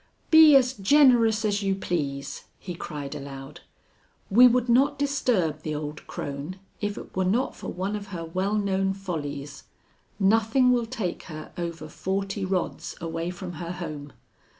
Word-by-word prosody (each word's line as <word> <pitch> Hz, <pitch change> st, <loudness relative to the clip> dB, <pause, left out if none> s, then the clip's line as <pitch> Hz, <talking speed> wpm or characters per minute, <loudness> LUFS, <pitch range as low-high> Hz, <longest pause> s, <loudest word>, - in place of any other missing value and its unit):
"Be 315 Hz, -2 st, +9 dB
as 260 Hz, -1 st, +5 dB
generous 230 Hz, -1 st, +4 dB
as 205 Hz, -1 st, +1 dB
you 195 Hz, -1 st, +1 dB
please!" 145 Hz, -7 st, -3 dB
he 180 Hz, -, -7 dB
cried 150 Hz, -4 st, -6 dB
aloud. 135 Hz, 0 st, -8 dB, 0.7 s
"We 245 Hz, +5 st, +8 dB
would 245 Hz, 0 st, +2 dB
not 265 Hz, +4 st, +3 dB
disturb 245 Hz, -, 0 dB
the 155 Hz, -1 st, -3 dB
old 150 Hz, 0 st, -6 dB
crone 145 Hz, +5 st, -5 dB, 0.3 s
if 205 Hz, -1 st, -2 dB
it -, -, -10 dB
were 185 Hz, -, +1 dB
not 220 Hz, +8 st, 0 dB
for -, -, -8 dB
one 190 Hz, +4 st, -3 dB
of 205 Hz, -1 st, -6 dB
her 175 Hz, -4 st, -6 dB
well 185 Hz, +5 st, -1 dB
known 195 Hz, -2 st, 0 dB
follies. 145 Hz, -7 st, -5 dB, 0.5 s
Nothing 225 Hz, +5 st, +4 dB
will 240 Hz, -2 st, +1 dB
take 190 Hz, -6 st, -3 dB
her 155 Hz, -3 st, -8 dB
over 170 Hz, -3 st, -5 dB
forty 195 Hz, +4 st, -3 dB
rods 185 Hz, -1 st, -2 dB
away 165 Hz, 0 st, -3 dB
from 180 Hz, 0 st, -6 dB
her 170 Hz, +1 st, -4 dB
home. 155 Hz, -5 st, -7 dB
190 Hz, 155 wpm, -26 LUFS, 160-220 Hz, 0.7 s, Be